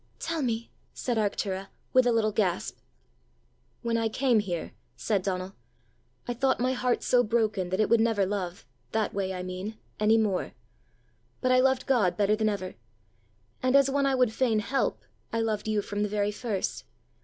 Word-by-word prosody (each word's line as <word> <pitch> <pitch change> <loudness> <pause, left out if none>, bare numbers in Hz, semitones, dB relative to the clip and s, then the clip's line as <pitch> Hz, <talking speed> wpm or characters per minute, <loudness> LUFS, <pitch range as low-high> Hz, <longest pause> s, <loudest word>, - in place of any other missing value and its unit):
"Tell 330 -1 -2
me," 230 -3 -2 0.2
said 245 -3 -1
Arctura, 195 -2 -1 0.3
with 255 -1 +5
a - - +4
little 220 -2 +2
gasp. 180 - -1 1.0
"When 230 -1 +1
I 225 -1 +1
came 245 0 +2
here," 175 -5 -3 0.2
said 205 -4 0
Donal, 185 0 -3 0.7
"I 245 - -1
thought 265 +2 +1
my 255 +2 +2
heart 250 -1 0
so 245 - +4
broken 215 -5 0
that 185 +2 -1
it 215 - +4
would 230 - +4
never 220 -3 +2
love 185 -5 -4 0.3
that 220 -1 0
way, 195 -1 -1
I 180 -1 -4
mean 185 +4 -5 0.2
any 215 +1 +4
more. 210 -4 0 0.9
But 255 - +1
I 255 - +6
loved 265 0 +2
God 230 -10 +2
better 210 0 +3
than 215 0 +1
ever: 195 -3 -3 0.9
and 255 +1 +2
as 275 -1 +5
one 280 0 +2
I 270 - +2
would 250 -4 +2
fain 235 -3 +2
help, 260 +6 -1 0.3
I 230 - 0
loved 220 -2 -1
you 215 -1 +1
from 205 +1 -3
the 210 - 0
very 205 0 0
first. 210 -2 -3
220 Hz, 180 wpm, -28 LUFS, 200-245 Hz, 1.0 s, I